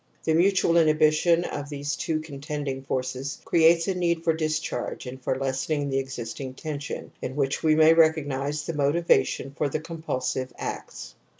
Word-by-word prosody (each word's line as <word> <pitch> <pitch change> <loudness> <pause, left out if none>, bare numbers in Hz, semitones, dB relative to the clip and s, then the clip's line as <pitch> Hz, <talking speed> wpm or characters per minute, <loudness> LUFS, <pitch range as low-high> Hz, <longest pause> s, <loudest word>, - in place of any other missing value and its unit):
The 160 - +1
mutual 190 +2 +3
inhibi 155 0 +4
tion 170 +2 +3
of 145 -4 -5
these 145 0 -3
two 155 -1 -2
contending 145 -2 -5
forces 130 +1 -3
creates 165 0 +4
a 190 - +1
need 170 -2 0
for 165 - +3
discharge 155 -3 -3
and 130 +1 -8
for 130 - -1
lessening 135 +2 -1
the 135 - +1
existing 130 0 -6
tension, 145 -1 -6
in 130 - -4
which 140 -1 0
we 155 -1 +4
may 160 +1 +7
recognize 150 -3 +2
the 165 - -3
motiva 150 +4 +3
tion 135 - -5
for 150 -2 0
the 155 - -2
compulsive 130 -6 -3
acts. - - -6
150 Hz, 170 wpm, -26 LUFS, 135-160 Hz, -, may